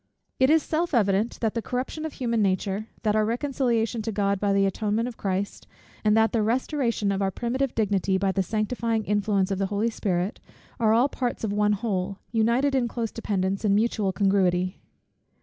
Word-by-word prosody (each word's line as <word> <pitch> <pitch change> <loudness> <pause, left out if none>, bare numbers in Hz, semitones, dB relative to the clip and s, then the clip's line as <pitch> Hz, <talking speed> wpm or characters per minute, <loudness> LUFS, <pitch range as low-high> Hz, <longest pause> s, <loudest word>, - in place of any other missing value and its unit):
It 260 +1 +5
is 315 0 +4
self 325 -1 -1
evident, 205 0 +2
that 225 -2 +1
the 230 - -2
corruption 255 +7 -3
of 315 - -5
human 235 -3 -1
nature, 195 +2 0 0.2
that 210 -1 +2
our 215 - +3
reconciliation 235 -1 0
to 225 +1 -3
God 200 -1 0
by 205 0 +1
the 195 0 +3
atonement 210 +4 0
of 245 - -6
Christ, 195 0 -3 0.4
and 210 0 +4
that 225 0 +4
the 230 - +1
restoration 235 -2 0
of 195 0 -1
our 195 - +2
primitive 245 +6 -2
dignity 200 -3 +1
by 190 0 +1
the 195 - 0
sanctifying 220 +2 -1
influence 205 -2 +1
of 195 - -1
the 195 - +1
Holy 210 +3 0
Spirit, 190 +1 -2 0.4
are 220 -2 +3
all 235 +4 +4
parts 250 -4 -3
of 210 -2 -1
one 210 0 +2
whole, 195 -2 -2
united 235 +5 +2
in 255 -3 +2
close 230 -1 -3
dependence 195 -3 -2
and 200 -2 +3
mutual 215 -2 +1
congruity. 185 -2 +1
215 Hz, 190 wpm, -25 LUFS, 195-235 Hz, 0.4 s, It